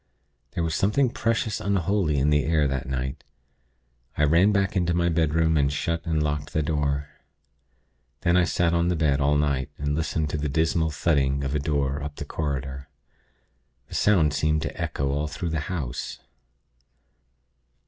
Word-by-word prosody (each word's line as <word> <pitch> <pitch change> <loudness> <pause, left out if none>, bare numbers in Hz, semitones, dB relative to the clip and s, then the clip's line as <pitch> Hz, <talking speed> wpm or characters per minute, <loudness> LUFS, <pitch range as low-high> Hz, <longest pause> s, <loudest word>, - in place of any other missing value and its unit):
There 85 - -1
was 80 -1 -1
something 115 - +2
precious 115 -3 -1
unholy 95 -5 +1
in 70 +2 +2
the 75 -1 +3
air 75 -1 +2
that 65 -2 -3
night. 65 +2 -3 0.9
I 75 - +2
ran 85 +7 +5
back 100 -1 +1
into 85 -2 +1
my 85 0 +2
bedroom, 80 0 +2
and 70 -1 +2
shut 85 +3 -2
and 80 -2 +1
locked 75 0 -3
the 80 - +1
door. 70 -2 -1 1.1
Then 85 - +2
I 90 -1 +4
sat 85 -2 +1
on 85 0 +2
the 90 - +1
bed 75 -3 +1
all 75 +1 +3
night, 70 -2 0
and 75 0 -1
listened 80 -1 -1
to 75 - -2
the 75 0 -2
dismal 80 +2 +1
thudding 70 -3 +1
of 70 0 -2
a 75 - +1
door 70 -1 -1
up 75 0 -6
the - - -6
corridor. 70 -2 -4 1.0
The - - -10
sound 85 -8 +3
seemed 75 0 +1
to 80 - -4
echo 70 +2 -1
through 85 +3 -4
all - - -4
the 80 - 0
house. 75 -9 -4
75 Hz, 170 wpm, -25 LUFS, 70-85 Hz, 1.1 s, ran